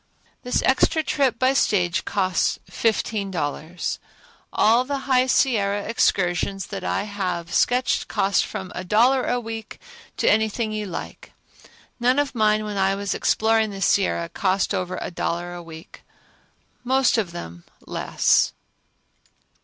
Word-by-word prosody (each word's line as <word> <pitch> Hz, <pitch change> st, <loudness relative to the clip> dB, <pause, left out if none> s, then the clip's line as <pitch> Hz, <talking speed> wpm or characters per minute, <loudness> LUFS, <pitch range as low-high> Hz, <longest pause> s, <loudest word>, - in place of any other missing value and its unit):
This 250 Hz, -, -1 dB
extra 315 Hz, +4 st, +3 dB
trip 275 Hz, -4 st, +1 dB
by 260 Hz, +2 st, +3 dB
stage 180 Hz, -9 st, +1 dB
costs 185 Hz, -3 st, 0 dB
fifteen 215 Hz, -2 st, -1 dB
dollars. 160 Hz, 0 st, -3 dB, 0.5 s
All 230 Hz, +3 st, +4 dB
the 275 Hz, +1 st, -3 dB
High 255 Hz, -1 st, +3 dB
Sierra 205 Hz, -6 st, +2 dB
excursions 190 Hz, -3 st, 0 dB
that 195 Hz, -, -4 dB
I -, -, -1 dB
have 185 Hz, -5 st, -4 dB
sketched 250 Hz, +1 st, +1 dB
cost 195 Hz, 0 st, +1 dB
from 185 Hz, -1 st, -6 dB
a 185 Hz, -, -5 dB
dollar 240 Hz, +8 st, +3 dB
a 245 Hz, -, +1 dB
week 225 Hz, -2 st, -7 dB, 0.4 s
to -, -, 0 dB
anything 220 Hz, +1 st, +2 dB
you 215 Hz, -1 st, -3 dB
like. 175 Hz, -, -8 dB, 0.7 s
None 250 Hz, +2 st, +2 dB
of 290 Hz, -1 st, 0 dB
mine 215 Hz, -2 st, +2 dB
when 210 Hz, -1 st, -4 dB
I 195 Hz, 0 st, +2 dB
was 200 Hz, 0 st, -2 dB
exploring 220 Hz, 0 st, +2 dB
the 195 Hz, -1 st, -7 dB
Sierra 185 Hz, -3 st, +1 dB
cost 195 Hz, +2 st, 0 dB
over 185 Hz, -1 st, -2 dB
a -, -, -5 dB
dollar 175 Hz, +1 st, -3 dB
a 175 Hz, -, -7 dB
week, 160 Hz, -1 st, -12 dB, 0.8 s
most 260 Hz, -1 st, +3 dB
of 190 Hz, -6 st, -2 dB
them 85 Hz, -, -8 dB, 0.2 s
less. -, -, +1 dB
205 Hz, 140 wpm, -23 LUFS, 185-240 Hz, 0.8 s, All